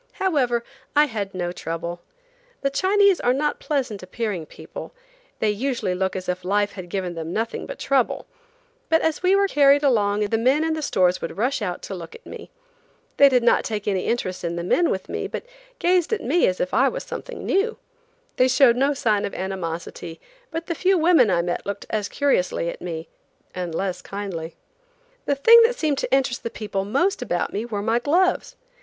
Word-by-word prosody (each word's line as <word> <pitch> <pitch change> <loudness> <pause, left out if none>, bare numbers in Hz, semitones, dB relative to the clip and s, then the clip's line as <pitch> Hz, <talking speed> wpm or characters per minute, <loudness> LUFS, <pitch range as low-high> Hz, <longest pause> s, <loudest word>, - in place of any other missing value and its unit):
However, 255 -11 +1 0.3
I 295 +1 +6
had 205 -7 -4
no 175 -1 -2
trouble. 170 0 -5 0.6
The 275 - 0
Chinese 395 +4 +3
are 245 +1 +2
not 295 +2 -1
pleasant 255 -9 -2
appearing 185 -3 -4
people; - - -10 0.4
they 215 - +1
usually 235 -3 -1
look 190 +1 -1
as 185 -1 -5
if 180 0 -2
life 205 +2 +1
had 185 -3 -9
given 185 -1 -3
them 165 0 -5
nothing 225 +4 -3
but - - -7
trouble; 270 -3 0 0.6
but 325 0 +3
as 320 -1 0
we 370 +2 +4
were 400 0 +3
carried 285 -3 +4
along 210 -6 +2
the 210 +2 0
men 265 +6 +3
in 320 0 0
the 315 - -3
stores 180 -10 +2
would 165 - -5
rush 250 +4 0
out 180 -4 -3
to - - -6
look 170 -3 -8
at 470 - -15
me. - - -9 0.7
They 280 - +8
did 250 -2 +3
not 235 - +4
take 215 -2 -4
any 190 -3 0
interest 185 -7 -2
in 170 0 -2
the 170 - -3
men 340 - +2
with 190 - -3
me, - - -3
but - - -6 0.3
gazed 360 +1 +2
at 445 - -1
me 335 +6 +3
as 185 - -1
if 180 - -2
I 265 +3 +4
was - - -5
something - - -7
new. 425 +4 +1 0.6
They 255 - +5
showed 255 -2 +5
no 280 +2 +2
sign 215 -6 +1
of - - -4
animosity, 170 -3 -5 0.3
but 330 +1 -4
the 335 - -2
few 370 +3 +2
women 320 -8 +5
I 170 -2 +2
met 175 0 -2
looked 200 0 -5
as 210 -2 -1
curiously 185 -11 +1
at - - -11
me, 165 -2 -5 0.5
and 175 -3 -4
less 190 0 -2
kindly. 185 -5 -6 0.7
The 285 - +2
thing 460 +12 +8
that 470 +2 +3
seemed 300 - 0
to - - -3
interest 265 -2 +1
the - - -4
people 205 -3 -4
most 280 - +1
about 175 -8 -2
me 210 +3 -2
were 210 -4 -4
my 225 +2 +2
gloves. 365 - +1
230 Hz, 200 wpm, -23 LUFS, 185-290 Hz, 0.7 s, They